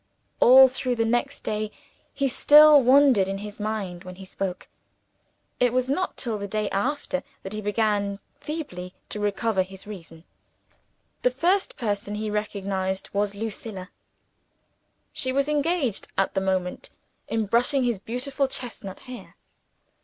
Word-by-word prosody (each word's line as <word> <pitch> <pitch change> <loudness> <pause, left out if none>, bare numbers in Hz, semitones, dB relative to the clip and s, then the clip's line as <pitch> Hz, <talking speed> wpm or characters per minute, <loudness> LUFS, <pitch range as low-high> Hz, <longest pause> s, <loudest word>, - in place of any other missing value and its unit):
All 265 +2 +9
through 255 -1 -2
the 225 -1 +1
next 240 +5 -1
day, 215 0 -2 0.4
he 275 - 0
still 295 +2 +7
wandered 255 -6 +5
in 195 0 -3
his 210 +1 -8
mind 205 -4 -3
when 185 -1 -9
he 190 +1 -11
spoke. 185 -1 -5 0.9
It 245 -1 +3
was 255 0 +1
not 365 +8 -1
till 225 -4 -3
the 200 - -4
day 210 0 -2
after, 275 +6 -1 0.2
that 190 - -6
he 215 - -4
began 205 -1 0 0.2
feebly 185 - -6
to 210 - -4
recover 205 0 0
his 190 0 -8
reason. 165 -6 -10 1.0
The 250 - +4
first 350 +10 0
person 205 -2 -2
he 215 0 -3
recognized 195 -2 -2
was 200 0 0
Lucilla. 205 -3 -6 1.2
She 260 - -2
was 275 +2 +1
engaged 300 - 0
at 195 - +1
the 190 - 0
moment 185 -1 -2 0.4
in 225 -1 -1
brushing 245 +6 +2
his 240 -5 0
beautiful 265 +6 -2
chestnut 230 -7 -7
hair. 250 -2 -11
215 Hz, 145 wpm, -25 LUFS, 195-260 Hz, 1.2 s, All